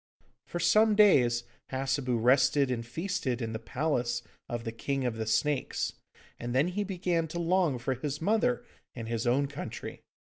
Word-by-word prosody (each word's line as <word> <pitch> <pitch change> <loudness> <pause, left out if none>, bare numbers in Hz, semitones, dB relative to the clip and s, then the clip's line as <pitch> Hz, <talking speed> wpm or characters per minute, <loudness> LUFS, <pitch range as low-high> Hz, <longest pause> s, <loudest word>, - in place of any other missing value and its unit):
For 175 - -4
some 210 +6 +4
days 125 - +5 0.3
Hassebu 130 -1 0
rested 135 +3 +4
and 115 -2 -2
feasted 150 -1 -2
in 115 -2 -3
the 110 - -3
palace 120 -2 -1 0.3
of 120 -1 -3
the 115 - -3
King 135 +3 -2
of 120 -2 -1
the 110 -1 -3
Snakes, 140 +5 0 0.5
and 120 +1 -4
then 145 +7 +3
he 205 +3 -1
began 180 -4 -1
to 160 - -6
long 170 -5 +2
for 120 +2 -1
his 140 +3 -4
mother 225 +7 +1 0.3
and 115 -2 -6
his 115 +1 -2
own 135 +4 +3
country. 140 +1 -7
135 Hz, 170 wpm, -30 LUFS, 120-170 Hz, 0.5 s, days